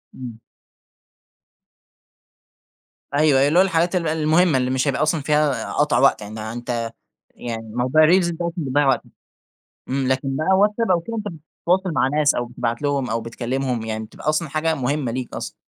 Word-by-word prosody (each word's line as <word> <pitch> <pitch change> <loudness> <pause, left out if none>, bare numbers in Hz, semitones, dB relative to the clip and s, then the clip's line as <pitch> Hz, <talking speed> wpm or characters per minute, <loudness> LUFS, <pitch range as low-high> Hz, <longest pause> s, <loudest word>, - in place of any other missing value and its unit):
إمم. 120 -3 -8 2.7
أيوه 145 -1 +3
أيوه 140 - +4
اللي 160 +5 +3
هو - - +7
الحاجات 175 -1 +1
ال 170 -2 0
المهمّة 160 0 +3
اللي 125 0 0
مش 130 +2 0
هيبقى 140 0 0
أصلًا 155 0 +1
فيها 150 -1 0
قطع 145 0 +2
وقت، 130 -4 +4
يعني 105 +2 -8
أنت 120 -1 -3 0.4
يعني 115 -2 -6
موضوع 130 +5 +3
الreels 175 0 +4
دوّة 170 +1 -3
اللي 165 - -2
بيضيّع 145 +2 +2
وقتك 135 - +1 0.8
إمم، 135 0 -1
لكن 135 +1 -1
بقى 175 +6 +2
واتساب 210 +1 +2
أو 175 - +3
كده 230 +7 -6
أنت 210 -1 -4
بتتواصل 180 +2 -2
مع 130 - +2
ناس 150 +1 +2
أو 120 - -1
بتبعت 120 0 -3
لهم 140 -3 -1
أو 115 +1 -1
بتكلمهم 125 +2 -3
يعني 110 0 -4
بتبقى 150 - -5
أصلًا 155 0 0
حاجة 160 +2 0
مهمّة 140 -1 -1
ليك 125 0 -5
أصلًا. - - -6
145 Hz, 175 wpm, -21 LUFS, 125-160 Hz, 2.7 s, هو